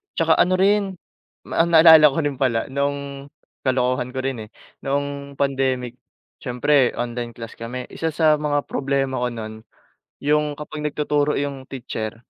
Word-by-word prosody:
'Tsaka 165 Hz, -1 st, +3 dB
ano 185 Hz, +1 st, +4 dB
rin, 195 Hz, 0 st, +2 dB, 0.5 s
ma 165 Hz, -, +1 dB
naalala 160 Hz, -2 st, +8 dB
ko 140 Hz, -, -2 dB
rin 145 Hz, -2 st, -2 dB
pala 115 Hz, -3 st, 0 dB
noong 140 Hz, 0 st, -3 dB, 0.4 s
kalokohan 125 Hz, -1 st, 0 dB
ko -, -, -1 dB
rin 125 Hz, -5 st, -3 dB
eh, -, -, -29 dB, 0.4 s
noong 140 Hz, 0 st, -3 dB
pandemic 130 Hz, -3 st, -1 dB, 0.4 s
siyempre 130 Hz, +1 st, +2 dB
online 120 Hz, 0 st, -4 dB
class 115 Hz, -1 st, -9 dB
kami, 125 Hz, +2 st, -6 dB
isa 165 Hz, -, -3 dB
sa 155 Hz, 0 st, +3 dB
mga 145 Hz, -1 st, 0 dB
problema 135 Hz, -1 st, -1 dB
ko 125 Hz, -, 0 dB
no'n 110 Hz, -2 st, -7 dB, 0.7 s
'yung 150 Hz, 0 st, +1 dB
kapag 150 Hz, 0 st, -7 dB
nagtuturo 150 Hz, 0 st, 0 dB
'yung 140 Hz, -2 st, -4 dB
teacher, 115 Hz, -3 st, -6 dB
140 Hz, 145 wpm, -22 LUFS, 125-150 Hz, 0.7 s, naalala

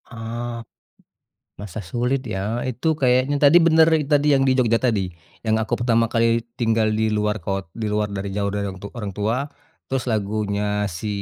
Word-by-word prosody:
Oh, 115 Hz, +1 st, -5 dB, 1.1 s
masa 105 Hz, 0 st, -6 dB
sulit 125 Hz, +3 st, 0 dB
ya? 95 Hz, -, -3 dB, 0.3 s
Itu 130 Hz, +5 st, -5 dB
kayaknya 130 Hz, +2 st, +3 dB
tadi 145 Hz, +4 st, +7 dB
bener 160 Hz, -1 st, +6 dB, 0.3 s
tadi 145 Hz, 0 st, +4 dB
yang 135 Hz, -, +3 dB
di 130 Hz, -, +4 dB
Jogja 115 Hz, -2 st, +3 dB
tadi, 110 Hz, -5 st, +2 dB, 0.4 s
yang 110 Hz, -1 st, +2 dB
aku 110 Hz, -, -6 dB
pertama 115 Hz, -1 st, +3 dB
kali 115 Hz, 0 st, +3 dB, 0.3 s
tinggal 115 Hz, -2 st, +2 dB
di -, -, +1 dB
luar 105 Hz, 0 st, 0 dB
kot 95 Hz, +1 st, -2 dB, 0.2 s
di 110 Hz, -, -1 dB
luar 105 Hz, 0 st, 0 dB
dari 100 Hz, +1 st, -3 dB
jauh 100 Hz, -1 st, 0 dB
dari 100 Hz, 0 st, -2 dB
orang 95 Hz, -1 st, -6 dB
tu -, -, -4 dB
orang 105 Hz, -3 st, -4 dB
tua, 105 Hz, +3 st, 0 dB, 0.5 s
terus 135 Hz, -1 st, -1 dB
lagunya 105 Hz, -1 st, -1 dB, 0.4 s
si 110 Hz, -, -6 dB
115 Hz, 175 wpm, -22 LUFS, 105-125 Hz, 1.1 s, tadi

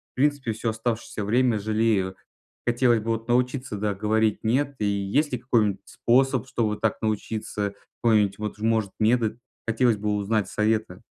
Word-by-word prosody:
принципе, 140 Hz, -2 st, +1 dB
всё 115 Hz, +1 st, -2 dB
оставшееся 110 Hz, -1 st, -3 dB
время 120 Hz, +1 st, +2 dB
жалею. 105 Hz, -3 st, +1 dB, 0.5 s
Хотелось 120 Hz, -1 st, +3 dB
бы 115 Hz, +2 st, -1 dB
вот 115 Hz, +1 st, -4 dB
научиться, 125 Hz, -1 st, 0 dB
да, 105 Hz, 0 st, -1 dB
говорить 110 Hz, +2 st, +1 dB
"нет". 135 Hz, +5 st, +1 dB
И -, -, +1 dB
есть 100 Hz, +9 st, 0 dB
ли 125 Hz, -, -1 dB
какой-нибудь 110 Hz, -5 st, +1 dB
способ, 130 Hz, 0 st, +2 dB
чтобы 110 Hz, -3 st, 0 dB
так 110 Hz, -, 0 dB
научиться? 105 Hz, -1 st, -2 dB, 0.3 s
Какой-нибудь 105 Hz, -4 st, +3 dB
вот 105 Hz, -1 st, -4 dB
ж, -, -, -16 dB
может, 110 Hz, -3 st, +1 dB
метод? 115 Hz, 0 st, +2 dB, 0.3 s
Хотелось 115 Hz, 0 st, +2 dB
бы 105 Hz, 0 st, -1 dB
узнать 105 Hz, 0 st, 0 dB
советы. 110 Hz, -4 st, 0 dB
110 Hz, 155 wpm, -25 LUFS, 105-120 Hz, 0.5 s, Хотелось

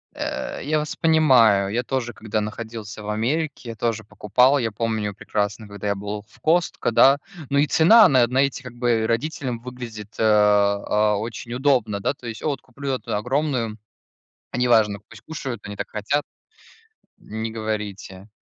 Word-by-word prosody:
Э, -, -, -4 dB
я 155 Hz, +2 st, +1 dB
вас 150 Hz, 0 st, -4 dB
понимаю, 125 Hz, -12 st, +4 dB
я 120 Hz, +3 st, 0 dB
тоже, 125 Hz, -1 st, -3 dB
когда 110 Hz, 0 st, -3 dB
находился 110 Hz, 0 st, -7 dB
в 105 Hz, -, -6 dB
Америке, 125 Hz, +2 st, -2 dB
тоже 115 Hz, 0 st, -2 dB
покупал. 125 Hz, +7 st, +2 dB
Я 115 Hz, -3 st, -1 dB
помню 110 Hz, -1 st, -2 dB
прекрасно, 105 Hz, +2 st, -3 dB
когда 100 Hz, 0 st, -6 dB
я 100 Hz, -, +1 dB
был 105 Hz, +1 st, -5 dB
в -, -, -22 dB
Costco, 170 Hz, -5 st, +1 dB
да, 135 Hz, +4 st, +6 dB, 0.3 s
ну 140 Hz, -, +2 dB
и 145 Hz, -, +3 dB
цена 215 Hz, +11 st, +7 dB
на, 130 Hz, -3 st, +4 dB
э, -, -, +2 dB
на 125 Hz, +2 st, 0 dB
эти 140 Hz, -1 st, +1 dB
как 125 Hz, -2 st, -9 dB
бы 120 Hz, -2 st, +1 dB
родителям 125 Hz, 0 st, -2 dB
выглядит, 115 Hz, -4 st, -9 dB
э, -, -, +2 dB
а, 105 Hz, 0 st, +3 dB
очень 115 Hz, +2 st, -6 dB
удобно, 125 Hz, -6 st, +1 dB
да. 100 Hz, -, 0 dB
То 125 Hz, -3 st, -11 dB
есть: 115 Hz, -1 st, -6 dB
"А, -, -, -2 dB
от 145 Hz, -2 st, -2 dB
куплю 135 Hz, +2 st, -5 dB
эту 130 Hz, -, -3 dB
огромную, 125 Hz, -1 st, -1 dB, 0.8 s
неважно, 110 Hz, -5 st, +3 dB
пусть -, -, -14 dB
кушают, 140 Hz, -9 st, -6 dB
они 105 Hz, -, -6 dB
так -, -, -4 dB
хотят". 115 Hz, +8 st, -1 dB, 1.0 s
Не 110 Hz, +1 st, -5 dB
говорите. 105 Hz, -3 st, -5 dB
115 Hz, 170 wpm, -23 LUFS, 105-135 Hz, 1.0 s, цена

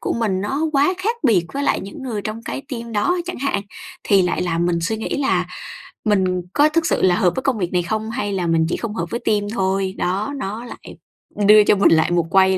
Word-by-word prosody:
của -, -, -2 dB
mình 210 Hz, -5 st, -1 dB
nó 270 Hz, +9 st, -2 dB
quá 290 Hz, +6 st, +3 dB
khác 440 Hz, +6 st, -1 dB
biệt 185 Hz, -8 st, +3 dB
với 280 Hz, -, -2 dB
lại -, -, +1 dB
những 195 Hz, +7 st, -9 dB
người 225 Hz, -6 st, -4 dB
trong 215 Hz, +3 st, -5 dB
cái 270 Hz, -, -5 dB
team 235 Hz, -4 st, -6 dB
đó, 215 Hz, +12 st, +1 dB
chẳng 360 Hz, -, -6 dB
hạn, 265 Hz, -7 st, -1 dB, 0.4 s
thì 195 Hz, -3 st, +4 dB
lại 180 Hz, -, 0 dB
làm 175 Hz, -1 st, 0 dB
mình 175 Hz, -1 st, +1 dB
suy 195 Hz, +7 st, -1 dB
nghĩ 220 Hz, -, -3 dB
là 275 Hz, -, +1 dB, 0.6 s
mình 190 Hz, -4 st, +1 dB
có 295 Hz, +1 st, +4 dB
thực 325 Hz, +1 st, +1 dB
sự -, -, +1 dB
là 180 Hz, -1 st, +4 dB
hợp 180 Hz, -1 st, +2 dB
với -, -, -2 dB
công 270 Hz, -4 st, +1 dB
việc 180 Hz, -3 st, -3 dB
này 180 Hz, -1 st, +2 dB
không 220 Hz, +5 st, -3 dB
hay 220 Hz, -4 st, -2 dB
là 180 Hz, -3 st, -1 dB
mình 165 Hz, -1 st, +2 dB
chỉ -, -, -1 dB
không 220 Hz, -2 st, -5 dB
hợp -, -, -2 dB
với 235 Hz, -, -3 dB
team 205 Hz, -3 st, 0 dB
thôi. 190 Hz, -2 st, 0 dB
Đó, 195 Hz, +9 st, -1 dB
nó 225 Hz, -1 st, -5 dB
lại -, -, -11 dB, 0.5 s
đưa 210 Hz, +1 st, +8 dB
cho 205 Hz, -, +4 dB
mình 200 Hz, -, +4 dB
lại 160 Hz, +1 st, +3 dB
một 170 Hz, -2 st, +1 dB
quay 190 Hz, 0 st, +4 dB
205 Hz, 250 wpm, -20 LUFS, 185-235 Hz, 0.6 s, đưa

